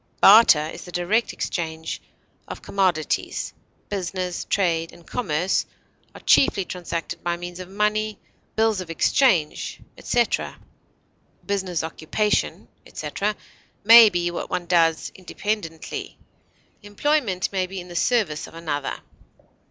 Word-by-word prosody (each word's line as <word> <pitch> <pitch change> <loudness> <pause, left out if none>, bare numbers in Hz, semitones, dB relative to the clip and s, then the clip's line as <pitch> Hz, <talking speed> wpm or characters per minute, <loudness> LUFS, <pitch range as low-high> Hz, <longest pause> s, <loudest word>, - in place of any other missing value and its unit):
Barter 195 -8 +7
is - - -9
the 180 - -10
direct 180 +7 0
exchange 160 -2 -4 0.5
of - - -8
commodities; 180 -6 -1 0.3
business, 185 -2 -3
trade, 165 -4 0
and 170 -1 -17
commerce 180 -6 -1 0.5
are - - -11
chiefly 195 -8 +4
transacted 170 -2 -5
by 175 0 -1
means 175 +1 -8
of 185 0 -8
money, 210 +1 0 0.4
bills 220 -3 +2
of 180 - -9
exchange, 165 - +1 0.2
etc. 240 -1 0 0.9
Business, 190 -5 -1
occupation, 165 +6 -1 0.2
etc., 210 +1 -3 0.5
may 230 0 +10
be 175 -2 -1
what 175 - -5
one 180 -1 -2
does 165 -2 +2
independently; 185 -3 -5 0.6
employment 205 -2 0
may 190 -2 -1
be 190 +1 -6
in 180 - -9
the 175 - -10
service 175 -6 +1
of - - -14
another. 150 -4 -3
180 Hz, 120 wpm, -23 LUFS, 170-210 Hz, 0.9 s, may